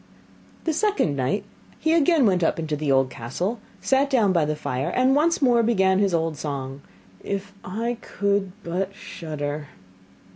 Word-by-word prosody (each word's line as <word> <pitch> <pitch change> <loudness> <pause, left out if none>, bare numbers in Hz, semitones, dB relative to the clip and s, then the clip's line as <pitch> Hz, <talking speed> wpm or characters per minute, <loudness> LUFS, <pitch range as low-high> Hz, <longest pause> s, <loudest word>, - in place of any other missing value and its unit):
The 325 - 0
second 405 - +1
night 135 +10 0 0.3
he 315 +1 +1
again 325 -3 +4
went 185 -4 +3
up - - +2
into 155 -2 -2
the 150 -1 -1
old 135 -1 +3
castle, 175 - -3 0.2
sat 270 +1 +2
down 225 -8 +3
by 165 -4 +3
the 150 +1 -1
fire, 135 -2 -2
and 260 +2 +3
once 310 +1 +2
more 240 -2 +5
began 190 -5 +3
his 200 -1 +2
old 165 -2 0
song: 140 -2 -5 0.4
'If 200 0 -4
I 230 +5 -3
could 200 -1 0
but 190 +3 -2
shudder! 150 -4 -5
190 Hz, 160 wpm, -24 LUFS, 150-235 Hz, 0.4 s, more